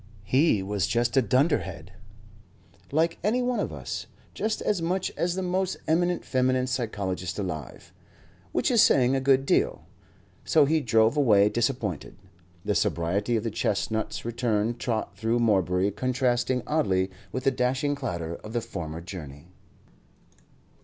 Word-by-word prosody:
He 130 Hz, -, +2 dB
was 100 Hz, -2 st, -1 dB
just 120 Hz, +1 st, 0 dB
a 135 Hz, -, +6 dB
dunderhead, 110 Hz, -, 0 dB, 1.0 s
like 165 Hz, +3 st, +1 dB
any 235 Hz, +5 st, +1 dB
one 245 Hz, -1 st, 0 dB
of -, -, -2 dB
us -, -, -6 dB, 0.3 s
just 215 Hz, 0 st, -2 dB
as 200 Hz, -5 st, 0 dB
much 180 Hz, +3 st, -1 dB
as 175 Hz, +1 st, -1 dB
the 190 Hz, -, -2 dB
most 185 Hz, +1 st, -1 dB
eminent 175 Hz, +2 st, +1 dB
feminine 130 Hz, 0 st, +1 dB
psychologist 100 Hz, -7 st, -3 dB
alive 80 Hz, -, -6 dB, 0.6 s
which -, -, +1 dB
is -, -, +5 dB
saying 130 Hz, 0 st, +4 dB
a 135 Hz, -, 0 dB
good 135 Hz, 0 st, +3 dB
deal. -, -, +1 dB, 0.6 s
So 155 Hz, -3 st, +4 dB
he 155 Hz, +2 st, +2 dB
drove 115 Hz, 0 st, +3 dB
away 105 Hz, -7 st, +5 dB
disappointed, 120 Hz, -, -2 dB, 0.5 s
the -, -, +1 dB
sobriety 100 Hz, +8 st, 0 dB
of 110 Hz, -, 0 dB
the 115 Hz, -, -2 dB
chestnut's 110 Hz, +2 st, -2 dB
return 115 Hz, -2 st, 0 dB
trot 115 Hz, -5 st, -3 dB
through 110 Hz, +3 st, 0 dB
Morebury 95 Hz, -4 st, +2 dB
contrasting 125 Hz, +1 st, 0 dB
oddly 95 Hz, -12 st, +1 dB, 0.2 s
with 130 Hz, -, -4 dB
the 135 Hz, -, +3 dB
dashing 130 Hz, +3 st, 0 dB
clatter 85 Hz, -, -4 dB
of 110 Hz, -, -10 dB
the 120 Hz, -, 0 dB
former 80 Hz, -6 st, -6 dB
journey. 85 Hz, -3 st, -9 dB
120 Hz, 145 wpm, -26 LUFS, 100-140 Hz, 1.0 s, a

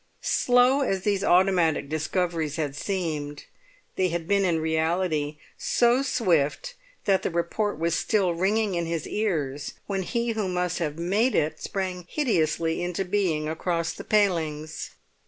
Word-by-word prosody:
Slow 250 Hz, +3 st, +4 dB
as 195 Hz, -8 st, 0 dB
these 200 Hz, -2 st, +1 dB
automatic 175 Hz, -6 st, +3 dB
discoveries 155 Hz, 0 st, -1 dB
had 150 Hz, -4 st, -2 dB
seemed, 150 Hz, -6 st, -3 dB, 0.5 s
they 185 Hz, -, +3 dB
had 170 Hz, -1 st, -3 dB
been 200 Hz, 0 st, +3 dB
in 170 Hz, -3 st, +2 dB
reality 160 Hz, -1 st, 0 dB, 0.2 s
so 240 Hz, +2 st, +3 dB
swift 225 Hz, -, +1 dB, 0.3 s
that 195 Hz, -1 st, +3 dB
the -, -, -1 dB
report 170 Hz, +4 st, -1 dB
was 165 Hz, +1 st, 0 dB
still 190 Hz, -1 st, +1 dB
ringing 200 Hz, +4 st, +1 dB
in 170 Hz, -1 st, -1 dB
his 165 Hz, -2 st, -3 dB
ears 150 Hz, -10 st, -2 dB
when 195 Hz, -1 st, -2 dB
he 235 Hz, +5 st, -1 dB
who 215 Hz, -3 st, -1 dB
must 180 Hz, 0 st, -1 dB
have 155 Hz, -3 st, -2 dB
made 200 Hz, +9 st, +1 dB
it 155 Hz, +1 st, 0 dB
sprang 185 Hz, -3 st, -4 dB
hideously 165 Hz, -, 0 dB
into 180 Hz, +2 st, -2 dB
being 180 Hz, -6 st, 0 dB
across 165 Hz, 0 st, -1 dB
the -, -, -8 dB
palings. 160 Hz, -7 st, 0 dB
175 Hz, 145 wpm, -26 LUFS, 160-200 Hz, 0.5 s, Slow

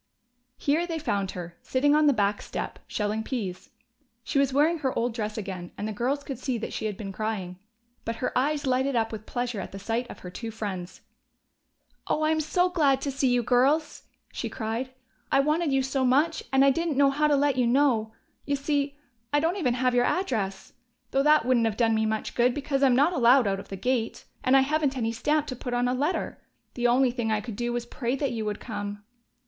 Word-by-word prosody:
Here 315 Hz, +5 st, +1 dB
they 330 Hz, -2 st, -2 dB
found 200 Hz, -, -1 dB
her, 175 Hz, -1 st, -8 dB
sitting 285 Hz, +3 st, +2 dB
on 305 Hz, 0 st, +4 dB
the -, -, +7 dB
back 205 Hz, -4 st, +1 dB
step, -, -, -5 dB
shelling 210 Hz, +1 st, -1 dB
peas. 200 Hz, -6 st, -4 dB, 0.5 s
She 275 Hz, -, 0 dB
was 275 Hz, -1 st, +2 dB
wearing 310 Hz, +5 st, +3 dB
her 265 Hz, -3 st, -1 dB
old 235 Hz, 0 st, 0 dB
dress 215 Hz, -2 st, -3 dB
again, 185 Hz, -4 st, -5 dB
and 210 Hz, -, -3 dB
the 215 Hz, -, -3 dB
girls 260 Hz, +7 st, -1 dB
could 275 Hz, -2 st, -6 dB
see 260 Hz, -4 st, -2 dB
that 225 Hz, -, -5 dB
she -, -, -3 dB
had 205 Hz, -3 st, -5 dB
been 200 Hz, -3 st, -6 dB
crying. 195 Hz, -4 st, -4 dB, 0.4 s
But 230 Hz, -, -3 dB
her 250 Hz, -, -3 dB
eyes 290 Hz, +3 st, +1 dB
lighted 260 Hz, +1 st, +1 dB
up 225 Hz, -1 st, +1 dB
with 215 Hz, -1 st, -7 dB
pleasure 245 Hz, -3 st, -2 dB
at 190 Hz, -, -6 dB
the 195 Hz, -, -7 dB
sight 230 Hz, +5 st, -2 dB
of -, -, -9 dB
her 180 Hz, -, -8 dB
two 230 Hz, +5 st, -6 dB
friends. 195 Hz, -5 st, -6 dB, 1.1 s
"Oh, 310 Hz, -, 0 dB
I'm 315 Hz, 0 st, +2 dB
so 355 Hz, +4 st, +2 dB
glad 295 Hz, -7 st, +2 dB
to 280 Hz, -, -2 dB
see 275 Hz, 0 st, 0 dB
you 245 Hz, -1 st, +2 dB
girls!" 265 Hz, +6 st, +2 dB, 0.3 s
she -, -, -3 dB
cried. 230 Hz, +2 st, -3 dB, 0.4 s
"I 275 Hz, -, +4 dB
wanted 305 Hz, +2 st, +1 dB
you 270 Hz, 0 st, +2 dB
so 265 Hz, 0 st, 0 dB
much, 290 Hz, +6 st, +2 dB
and 270 Hz, 0 st, +5 dB
I 275 Hz, -, +6 dB
didn't 330 Hz, -1 st, -1 dB
know 280 Hz, -1 st, +5 dB
how 300 Hz, +2 st, +2 dB
to 295 Hz, -, +3 dB
let 285 Hz, -1 st, +2 dB
you 250 Hz, -2 st, +2 dB
know. 240 Hz, -4 st, +2 dB, 0.3 s
You 285 Hz, -, 0 dB
see, 285 Hz, 0 st, -1 dB, 0.3 s
I 290 Hz, -, +3 dB
don't 330 Hz, +5 st, 0 dB
even 250 Hz, -10 st, +1 dB
have 255 Hz, 0 st, +1 dB
your 245 Hz, 0 st, +3 dB
address 215 Hz, -, -2 dB, 0.4 s
though 270 Hz, -, +2 dB
that 300 Hz, -3 st, +4 dB
wouldn't 245 Hz, -3 st, +3 dB
have 215 Hz, -1 st, -3 dB
done 230 Hz, -2 st, +3 dB
me 220 Hz, 0 st, +1 dB
much 220 Hz, 0 st, -2 dB
good, 245 Hz, +1 st, +2 dB
because 275 Hz, -1 st, -1 dB
I'm 265 Hz, -3 st, +5 dB
not 290 Hz, +7 st, +4 dB
allowed 250 Hz, -3 st, +5 dB
out 195 Hz, -1 st, 0 dB
of -, -, -11 dB
the 195 Hz, -, -5 dB
gate, 240 Hz, +2 st, -1 dB, 0.2 s
and 260 Hz, +1 st, +5 dB
I -, -, +6 dB
haven't 285 Hz, -1 st, 0 dB
any 225 Hz, -2 st, 0 dB
stamp 295 Hz, +6 st, 0 dB
to 255 Hz, -, -5 dB
put 245 Hz, 0 st, -4 dB
on 245 Hz, 0 st, +1 dB
a 250 Hz, -, +1 dB
letter. 290 Hz, +7 st, -2 dB, 0.3 s
The 245 Hz, -1 st, +1 dB
only 250 Hz, +1 st, +4 dB
thing 235 Hz, -3 st, -2 dB
I 215 Hz, -, +2 dB
could 220 Hz, 0 st, -7 dB
do 240 Hz, +2 st, -2 dB
was 240 Hz, 0 st, -2 dB
pray 240 Hz, +1 st, -2 dB
that 275 Hz, -1 st, -1 dB
you 225 Hz, -2 st, -3 dB
would 210 Hz, -1 st, -3 dB
come!" 205 Hz, -2 st, -6 dB
250 Hz, 230 wpm, -27 LUFS, 220-285 Hz, 1.1 s, the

